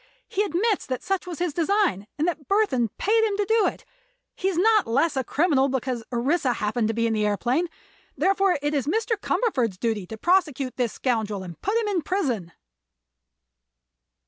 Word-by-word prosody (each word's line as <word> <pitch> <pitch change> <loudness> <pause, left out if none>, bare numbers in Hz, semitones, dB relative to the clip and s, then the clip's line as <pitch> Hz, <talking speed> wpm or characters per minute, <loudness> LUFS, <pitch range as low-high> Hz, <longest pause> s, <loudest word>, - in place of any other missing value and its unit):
He 395 - -1
admits 410 +2 0
that 255 -2 -3
such 390 -2 -2
was 345 -3 -5
his 350 -3 -1
design 340 - +1
and 310 +3 +1
that 315 -5 -3
Burthon 340 - +2
paid 445 +3 +2
him 415 -2 0
to 410 - +1
do 445 +1 +3
it. - - -5 0.5
He 380 - -2
is 380 -3 0
not 430 +2 +4
less 280 +7 +1
a 265 - 0
criminal 280 -1 +2
because 255 -2 -2
Orissa 255 +2 +1
happened 220 0 -1
to 225 - -1
be 230 0 +1
in 225 - +1
the 215 - 0
aëroplane. 240 - +1 0.5
Therefore 390 -2 +2
it 295 +1 0
is 280 -2 -1
Mr. 445 +6 +1
Cumberford's 270 - 0
duty 215 -3 -2
to 220 - -7
prosecute 295 - +1
this 245 -3 -1
scoundrel 220 -6 -1
and 175 -3 -10
put 410 +4 0
him 450 - -1
in 390 -4 0
prison." 260 - -2
295 Hz, 185 wpm, -25 LUFS, 235-390 Hz, 0.5 s, not